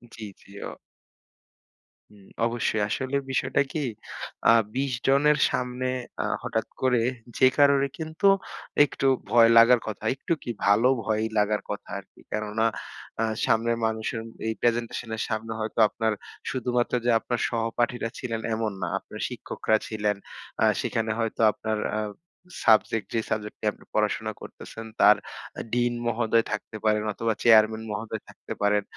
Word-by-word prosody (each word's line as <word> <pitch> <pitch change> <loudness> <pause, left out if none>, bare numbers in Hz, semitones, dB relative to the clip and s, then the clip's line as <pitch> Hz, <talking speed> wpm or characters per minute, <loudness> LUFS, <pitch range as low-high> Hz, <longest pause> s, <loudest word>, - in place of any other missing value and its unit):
জি, - - -12 0.2
জি, - - -21 0.2
ও - - -7 1.4
হুম, 100 -2 -18 0.2
অবশ্যই। 115 -2 0
আসলে 130 +4 -2 0.2
বিষয়টা 130 - +1
কি 160 - -2 0.7
আ - - +9 0.2
২০ 135 +1 0 0.2
জনের 145 +2 +4
সামনে 125 0 -2 0.4
আ - - -2 0.2
হঠাৎ - - -2
করে 125 -2 +3 0.4
যে 130 - +7
কারোরই 140 -1 +5
কিন্তু 160 +5 0 0.6
একটু 135 - -1 0.2
ভয় 115 -1 +7
লাগার 115 +1 +8
কথা। 110 - -5
একটু 140 - -1
কি - - -7 0.2
ভালো 105 +5 +5 0.2
ভয়ই 110 0 0
লাগার 105 0 +2
কথা 105 - -5
আরকি। 95 - -18
কেননা 110 +1 -1 0.6
আ - - +3 0.2
সামনের 115 +1 +2
মানুষের 110 0 -2 0.3
এই 110 - 0
প্রেজেন্টেশন 120 0 0
এর 110 - -4
সামনে 110 0 -3
হয়তো 110 +1 -3
আপনার 110 +1 0 0.4
শুধুমাত্র 125 -1 -1
যে - - +3
আপনার 120 +1 -2
সহপাঠীরা 115 +1 -1
ছিলেন 115 -3 -3
এমন 110 -1 -1
না। - - -1
আপনার - - -11
শিক্ষকরা 110 - -1
ছিলেন। 105 -1 0 0.5
আ - - +5 0.2
সেখানে 115 -1 -1
হয়তো 115 0 -1
আপনার 110 +1 -3 0.2
আ - - 0 0.7
সাবজেক্ট 110 -1 +4
যে 115 - +2
সাবজেক্টটি 105 0 -4
আপনি - - -19
পড়াশোনা 110 0 0
করতেছেন 115 0 -9 0.2
তার 105 +1 +8 0.6
ডিন 120 0 +2
মহোদয় 115 0 +2
থাকতে 110 - -4
পারেন 105 0 +3
অথবা 115 +1 0
চেয়ারম্যান 110 -1 +5
মহোদয় 110 0 -4
থাকতে - - -8
পারেন। 105 0 +3
115 Hz, 145 wpm, -26 LUFS, 110-120 Hz, 1.4 s, আ